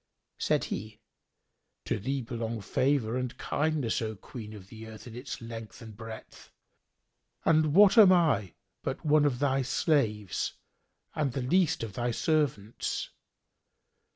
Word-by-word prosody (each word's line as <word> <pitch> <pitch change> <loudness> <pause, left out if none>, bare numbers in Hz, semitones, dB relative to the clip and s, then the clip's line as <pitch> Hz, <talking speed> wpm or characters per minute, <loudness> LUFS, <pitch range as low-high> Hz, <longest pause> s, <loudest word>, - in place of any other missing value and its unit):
Said - - +1
he, 110 +1 -5 0.9
"To - - -1
thee 135 +5 -2
belong 115 -1 -4
favour 125 +2 +1
and 125 0 -3
kindness, 150 -7 0
O 110 -1 -3
Queen 105 +2 -9
of 100 -3 -11
the 110 0 -10
earth 110 -1 -11
in 115 -2 -9
its 125 +1 -6
length 115 -1 -8
and 110 -3 -10
breadth; 115 0 -10 1.0
and 155 -1 +3
what 205 +3 +8
am 200 -4 +9
I 145 - +3 0.3
but - - -4
one 150 0 +5
of 135 -4 +1
thy 135 0 +1
slaves 115 - 0 0.6
and 140 -5 -1
the 135 - -2
least 165 +1 +2
of 110 -4 -5
thy 120 +3 -1
servants. 120 -5 -1
120 Hz, 140 wpm, -29 LUFS, 110-150 Hz, 1.0 s, am